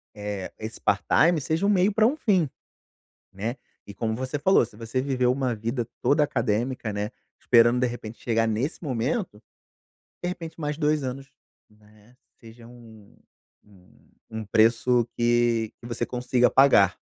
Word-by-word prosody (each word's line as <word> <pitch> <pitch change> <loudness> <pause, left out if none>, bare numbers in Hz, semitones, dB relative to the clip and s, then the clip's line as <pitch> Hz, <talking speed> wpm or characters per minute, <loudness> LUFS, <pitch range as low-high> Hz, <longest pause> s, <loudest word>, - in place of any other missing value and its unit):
eh, 105 -2 -5
esse 110 +1 -7
part-time 160 - +3
seja 160 +7 -1
um - - +3
meio 195 0 +3
pra 220 +1 +3
um 255 +6 +2
fim, 185 - +1 0.8
né. 110 +6 -4 0.3
E 100 - -9
como 110 +3 -2
você 130 +4 -3
falou, 190 +2 +4
se 105 - -17
você 115 +3 -3
viveu 130 -2 +1
uma 130 -2 -1
vida 115 +2 -3
toda 145 +1 +3
acadêmica, 120 -3 -1
né, 105 +1 -3 0.3
esperando 120 0 +4
de 125 - +2
repente 120 -2 -8
chegar 115 -1 +1
nesse 120 +11 -2
momento, 130 - -2 0.8
de 175 - -1
repente 170 -2 -7
mais 150 -1 -2
2 150 -1 +1
anos, 135 +1 -6 0.4
né, 105 +2 -23 0.3
seja 115 0 -14
um 115 -4 -16 0.5
um 95 -3 -23 0.2
um 110 0 -5
preço 115 +3 +3
que 120 -2 +2
que - - -11
você 120 0 -3
consiga 125 0 +1
pagar, 135 -8 +5
120 Hz, 155 wpm, -25 LUFS, 110-140 Hz, 0.8 s, pagar